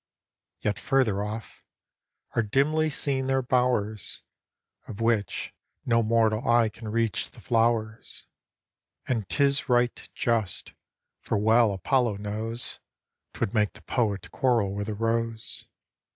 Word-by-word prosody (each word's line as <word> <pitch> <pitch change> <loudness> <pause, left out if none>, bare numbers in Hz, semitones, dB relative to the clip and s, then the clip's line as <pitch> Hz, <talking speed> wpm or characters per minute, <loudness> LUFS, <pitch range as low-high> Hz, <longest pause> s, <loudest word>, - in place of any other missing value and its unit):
Yet 105 -1 -1
further 115 -8 +2
off, 110 +2 -7 0.7
are - - +4
dimly 145 +8 +2
seen 135 -2 -1
their 135 0 +2
bowers, 125 -5 +1 0.6
Of 105 - -8
which, 115 -2 0 0.3
no 115 -1 +3
mortal 110 0 +2
eye 120 -1 +5
can 110 +1 -10
reach 115 -1 0
the - - -15
flowers; 115 -1 0 0.8
And 115 -6 -1
'tis 140 -1 +2
right 120 -1 +1
just, 110 -7 -1 0.5
for - - -1
well 110 +1 +4
Apollo 115 +2 +1
knows 110 +3 -4 0.6
'Tvvould 95 - -1
make 105 -3 +2
the - - -15
Poet 105 -6 -1
quarrel 115 -7 +2
with 100 +1 -3
the 105 - -3
rose. 115 +1 -2
115 Hz, 125 wpm, -27 LUFS, 105-125 Hz, 0.8 s, eye